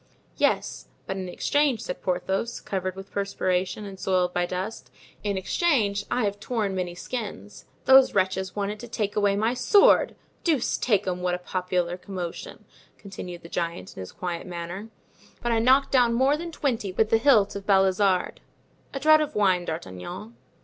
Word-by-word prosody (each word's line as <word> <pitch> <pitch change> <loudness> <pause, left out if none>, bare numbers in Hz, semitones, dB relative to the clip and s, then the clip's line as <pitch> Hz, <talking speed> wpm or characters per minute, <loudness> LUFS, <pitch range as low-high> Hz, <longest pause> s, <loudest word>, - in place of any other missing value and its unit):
"Yes, - - 0 0.2
but 190 - -3
in 185 -1 -5
exchange," 285 +4 +1
said - - -5
Porthos, 190 +5 -1
covered 185 -1 -3
with 195 0 -10
perspiration 195 0 -1
and 195 -1 -9
soiled 180 -2 +1
by 175 0 0
dust, 185 +5 -5 0.3
"in 200 -2 -1
exchange, 205 - +1
I 250 - 0
have 205 0 -1
torn 215 -3 -2
many 180 -2 -3
skins. 140 - -6 0.2
Those 265 0 +7
wretches 190 0 0
wanted 205 +1 -2
to 240 - -8
take 215 -3 -2
away 205 -1 +2
my 220 +4 +1
sword! 400 - +5 0.3
Deuce 305 -8 +1
take 210 -5 +2
'em, 180 -1 -2
what 180 0 0
a - - -3
popular 180 -1 -2
commotion!" 180 -3 -7 0.3
continued 180 -3 -8
the - - -9
giant, 170 - -4
in - - -9
his 95 - -8
quiet 175 -1 -5
manner; 175 +4 -6 0.5
"but 240 - -1
I 230 - +3
knocked 260 +4 +4
down 245 -3 +4
more 265 +4 +3
than 335 +2 -6
twenty 245 - -1
with 215 +3 +1
the 225 - +5
hilt 225 -7 +4
of 200 0 -7
Balizarde. 190 -1 +2 0.5
A - - -1
draught 310 +2 +6
of 300 0 -3
wine, 185 -4 +2
D'Artagnan." 170 - -6
195 Hz, 170 wpm, -26 LUFS, 180-230 Hz, 0.5 s, Those